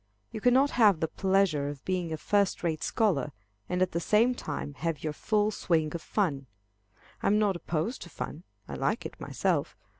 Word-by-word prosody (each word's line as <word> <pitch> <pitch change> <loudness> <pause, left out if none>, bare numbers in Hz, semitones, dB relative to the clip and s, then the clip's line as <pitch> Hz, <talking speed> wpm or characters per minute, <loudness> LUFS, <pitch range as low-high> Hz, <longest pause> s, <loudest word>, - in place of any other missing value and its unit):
You 215 - -6
cannot 260 +4 +4
have 210 -8 +5
the 160 - 0
pleasure 190 -6 +1
of 145 -2 -9
being 180 -3 -1
a 160 - -2
first 200 +4 +1
rate 160 -3 -1
scholar, 170 - +1 0.4
and 180 0 +2
at 185 - -1
the 170 - -1
same 220 +8 +3
time 145 -9 -5
have 165 -3 -2
your 155 -1 -2
full 210 +5 +1
swing 160 -6 0
of 170 - -4
fun. 150 -11 -1 0.7
I - - 0
am 210 - +4
not 205 -3 +2
opposed 170 +7 -2
to 175 - -8
fun. 155 0 -6 0.3
I 70 - -7
like 65 - -1
it - - -8
myself. - - -1
180 Hz, 190 wpm, -29 LUFS, 155-210 Hz, 0.7 s, have